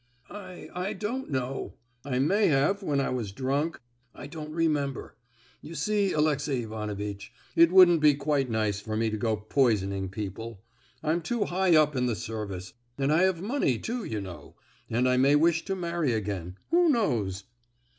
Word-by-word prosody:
"I—I 185 -1 -6
don't 230 +7 -4
know—I 125 -1 -4
may 195 +11 +3
have 155 +8 +2
when 145 -7 0
I 135 - 0
was 120 -6 -3
drunk—I 125 -1 -4
don't 155 +1 -7
remember. 150 -5 -1 0.5
You 165 +3 -9
see, 205 -1 +1
Alexey 145 -4 +1
Ivanovitch, 105 -2 -5 0.2
it 170 0 +6
wouldn't 180 -3 +7
be 150 -2 +6
quite 140 -2 0
nice 110 -3 0
for 110 0 -4
me 110 0 +1
to 110 - -2
go 110 0 0
poisoning 100 -4 +1
people. 105 +2 -6 0.4
I'm 160 +2 +1
too 220 +6 -1
high 180 -1 +2
up 150 -2 +4
in 125 -1 +1
the 120 - 0
service, 100 -5 -6 0.2
and 140 +2 +1
I 160 - +4
have 185 -2 +2
money, 210 - +1
too, 235 - -4
you 110 - -3
know—and 95 - -5
I 125 0 +3
may 135 +3 +5
wish 165 +2 +3
to 195 - -2
marry 170 -7 -1
again, 95 -4 -4
who 345 0 +5
knows." 110 - 0
135 Hz, 160 wpm, -28 LUFS, 110-170 Hz, 0.5 s, wouldn't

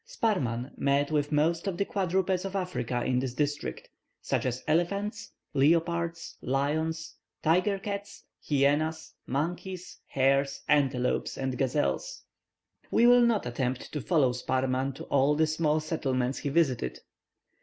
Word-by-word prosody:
Sparrman 140 - -1
met 140 +2 +2
with 145 -1 0
most 165 +5 +1
of 185 -3 -2
the 200 - +1
quadrupeds 190 -1 0
of 195 0 -5
Africa 130 -10 -2
in 125 -1 +2
this 125 -1 -3
district, 145 +1 -2 0.3
such - - -1
as 125 0 -3
elephants, 200 +7 0 0.2
leopards, 165 +3 +1
lions, 160 +4 -1 0.3
tiger 185 +5 +3
cats, 200 +1 -6 0.3
hyenas, 150 +3 +1
monkeys, 175 +6 -3
hares, 135 +1 +1
antelopes, 135 -4 +1
and 130 -1 -2
gazelles. 145 - -1 0.7
We 235 - +4
will 245 0 +7
not 235 -3 +2
attempt 125 +1 -3
to 150 - -3
follow 145 -5 +3
Sparrman 130 +1 -1
to - - -8
all 140 +2 +2
the 160 +1 +3
small 155 0 +1
settlements 135 -5 -1
he 145 - -2
visited. 135 - +1
150 Hz, 135 wpm, -29 LUFS, 135-175 Hz, 0.7 s, will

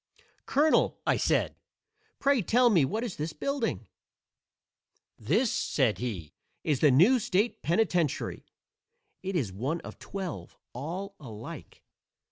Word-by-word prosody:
"Colonel," 300 +3 +3
I - - +3
said, - - +1 0.6
"pray 275 -3 +3
tell 240 +6 +4
me 165 -9 +5
what 215 - -2
is 235 -6 -4
this 155 +1 -3
building." 275 - -2 1.3
"This," 250 -4 +1
said 130 -7 +1
he, 100 -11 -4 0.3
"is 150 -5 +1
the 150 - +6
new 180 - +6
state 210 +2 0
penitentiary. 170 -2 0 0.8
It 190 0 -4
is 120 - -1
one 135 - -2
of - - -10
twelve, 190 -5 -6 0.2
all 175 +10 -5
alike." 110 -7 -9
175 Hz, 120 wpm, -29 LUFS, 135-225 Hz, 1.3 s, the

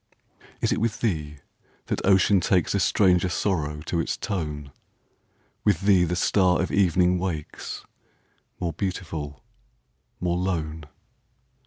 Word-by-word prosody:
Is - - +1
it - - +1
with 115 -1 -1
thee 75 -9 -1 0.5
that - - -2
ocean 95 +1 +5
takesA 95 +2 +2
stranger 90 -1 +3
sorrow 80 -5 -1
to 85 +2 -2
its 80 - -1
tone? 75 -7 -4 0.9
With 100 -5 +2
thee 95 -3 +4
the 90 +1 -1
star 90 0 +3
of 90 - -1
evening 90 -1 +3
wakesMore 85 0 -7
beautiful, 80 -6 -4 0.8
more 90 -1 0
lone? 80 -4 -2
90 Hz, 115 wpm, -25 LUFS, 80-95 Hz, 0.9 s, ocean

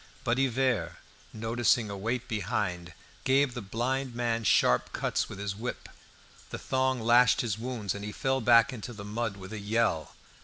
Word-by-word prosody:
But 120 +2 +1
Hivert, 130 -8 +1 0.4
noticing 115 0 +1
a - - -4
weight 120 +6 -3
behind, 90 -5 -2 0.3
gave 135 0 +3
the 120 - -5
blind 120 +5 -2
man 115 -1 -1
sharp 60 - +3
cuts - - -1
with - - -8
his 100 0 -3
whip. 120 +4 -5 0.6
The - - -5
thong 130 -1 0
lashed 120 +2 +5
his 110 -3 -2
wounds, 115 -5 -3
and 100 - -7
he 105 - -4
fell 135 +3 -1
back 115 +2 +5
into 120 +1 -7
the 100 -2 -9
mud 110 0 -3
with 95 +2 -9
a 110 - -4
yell. 105 -7 0
115 Hz, 170 wpm, -29 LUFS, 100-125 Hz, 0.6 s, lashed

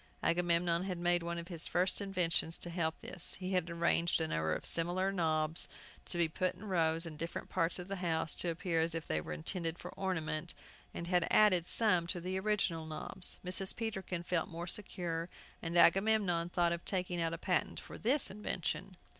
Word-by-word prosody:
Agamemnon 170 0 +2
had 185 -2 -3
made 175 0 +2
one 170 0 -3
of 170 0 -6
his 170 -3 -1
first 185 +3 +1
inventions 180 -4 +1
to 175 - -5
help 160 -2 -1
this. 175 - +1
He 185 +1 -5
had 180 -2 +1
arranged 170 0 +2
a 160 - 0
number 80 - 0
of - - -6
similar 180 +3 +2
knobs 160 -3 0 0.4
to - - -5
be 170 -1 +3
put 185 +3 -1
in 215 - -11
rows 165 -3 +1
in 155 -2 -8
different 165 +2 -5
parts 165 -2 0
of 180 0 -7
the 195 0 -4
house, 165 -3 0
to 175 - +1
appear 165 0 -1
as 165 +1 +1
if 165 - -3
they 80 0 -1
were 75 - -8
intended 165 - -3
for - - -8
ornament, 165 -3 -3 0.4
and 170 - -6
had 175 -1 +2
added 185 -5 +5
some 180 -7 +4
to 175 - -1
the 185 +2 -2
original 190 -6 0
knobs. 160 +4 -1
Mrs. 190 +1 +4
Peterkin 190 -6 -3
felt 175 -2 -1
more 170 0 -5
secure, 175 -3 -3 0.3
and 170 +1 -2
Agamemnon 190 -2 +4
thought 175 -1 +2
of 170 0 -3
taking 180 -2 -1
out 165 0 +1
a 165 - -3
patent 180 0 -1
for - - -10
this 265 +6 +2
invention. 190 -2 -3
175 Hz, 195 wpm, -34 LUFS, 165-185 Hz, 0.4 s, added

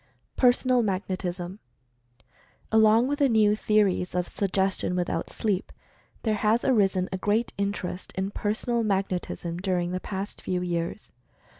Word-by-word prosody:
PERSONAL 250 0 +4
MAGNETISM. 185 -2 -3 1.1
Along 220 +2 +5
with 290 +2 -1
the 280 -2 +4
new 215 -2 +4
theories 205 -4 +1
of 180 -1 0
"Suggestion 190 -2 0
without 180 -1 -1
Sleep," 200 -4 -2 0.5
there 220 - +1
has 215 +2 +1
arisen 195 -7 +3
a 190 - -3
great 215 +4 0
interest 200 -2 -3
in 190 +1 -2
"Personal 220 +4 -1
38 225 - 0
Mental 195 -2 +1
Fascination 170 -1 -6
Magnetism," - - -6
during 180 -2 0
the 185 - -2
past 195 +2 -5
few 180 -1 -2
years. 170 +2 -3
200 Hz, 145 wpm, -26 LUFS, 185-220 Hz, 1.1 s, Along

